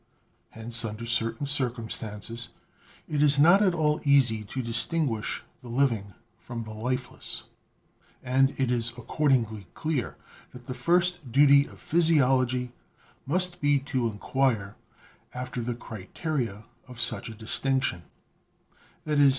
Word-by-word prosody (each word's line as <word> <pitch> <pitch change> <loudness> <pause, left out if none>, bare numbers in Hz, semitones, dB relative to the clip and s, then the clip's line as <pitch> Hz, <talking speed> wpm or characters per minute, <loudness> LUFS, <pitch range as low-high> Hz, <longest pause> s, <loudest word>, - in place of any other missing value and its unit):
Hence, 115 +1 0
under 110 +1 -5
certain 115 +4 0
circumstances 115 -4 -4 0.6
it 150 -1 -1
is 145 -1 +6
not 170 +7 +6
at 185 -4 +3
all 150 -2 +1
easy 130 -7 +4
to 130 +5 -4
distinguish 120 0 -1 0.2
the 125 - -12
living 115 -6 0 0.2
from 120 -2 -6
the 110 -1 -8
lifeless, 125 +4 -4 0.8
and 135 +2 +2
it 130 -2 +1
is 115 -2 0
accordingly 115 - 0
clear 155 -6 -2 0.4
that 125 -1 -12
the 130 - -4
first 175 -2 +1
duty 140 +2 +6
of - - -15
physiology 130 -6 +2 0.6
must 180 +3 +1
be 145 -1 +4
to 130 -3 -1
inquire 110 -1 -1 0.6
after 125 0 -4
the 120 +1 -3
criteria 115 - -4 0.2
of 125 -2 -11
such 120 0 -1
a 110 - -8
distinction 130 -1 -1 0.5
— - - -34
i.e. 145 -2 +5
125 Hz, 125 wpm, -27 LUFS, 115-145 Hz, 0.8 s, is